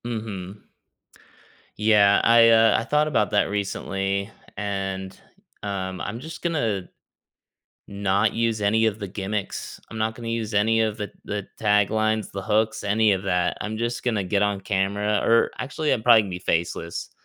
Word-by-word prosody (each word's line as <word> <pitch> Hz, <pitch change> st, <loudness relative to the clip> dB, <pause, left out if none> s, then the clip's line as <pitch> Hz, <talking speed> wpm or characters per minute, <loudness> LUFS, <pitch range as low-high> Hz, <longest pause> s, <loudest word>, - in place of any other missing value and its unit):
Mhm. 105 Hz, -4 st, -6 dB, 1.1 s
Yeah, 105 Hz, -2 st, +5 dB
I, 115 Hz, 0 st, +6 dB
uh, 115 Hz, 0 st, +5 dB
I -, -, -3 dB
thought 150 Hz, +4 st, +1 dB
about 105 Hz, -9 st, +1 dB
that 105 Hz, -, +3 dB
recently, 100 Hz, 0 st, -2 dB, 0.3 s
and, 95 Hz, -2 st, -4 dB, 0.5 s
um, 95 Hz, -2 st, -4 dB
I'm 110 Hz, +3 st, -4 dB
just 160 Hz, +4 st, -9 dB
gonna 115 Hz, -, -1 dB, 1.0 s
not 100 Hz, +1 st, +1 dB
use 115 Hz, -1 st, 0 dB
any 110 Hz, +2 st, +2 dB
of 110 Hz, -1 st, -1 dB
the 100 Hz, -, -5 dB
gimmicks. 100 Hz, +1 st, -5 dB
I'm 110 Hz, -, -7 dB
not 110 Hz, 0 st, -1 dB
gonna 115 Hz, -1 st, -7 dB
use 115 Hz, -1 st, -3 dB
any 110 Hz, +2 st, +3 dB
of 110 Hz, -1 st, 0 dB
the 105 Hz, -2 st, -6 dB
the 100 Hz, -1 st, -4 dB
taglines, 110 Hz, +1 st, +1 dB
the 95 Hz, -, -5 dB
hooks, 110 Hz, +1 st, 0 dB
any 105 Hz, +1 st, +3 dB
of 95 Hz, -1 st, -1 dB
that, 90 Hz, -2 st, 0 dB
I'm 110 Hz, +1 st, -4 dB
just 120 Hz, +1 st, -2 dB
gonna 110 Hz, -6 st, 0 dB
get 100 Hz, +2 st, +1 dB
on 100 Hz, -1 st, 0 dB
camera 100 Hz, +2 st, 0 dB
or 115 Hz, 0 st, +4 dB
actually, 145 Hz, +4 st, -1 dB
I'm 110 Hz, -, 0 dB
probably 115 Hz, -2 st, +7 dB
gonna 100 Hz, -, -7 dB
be 90 Hz, -, -4 dB
faceless, 85 Hz, -1 st, -2 dB
105 Hz, 165 wpm, -24 LUFS, 100-110 Hz, 1.1 s, probably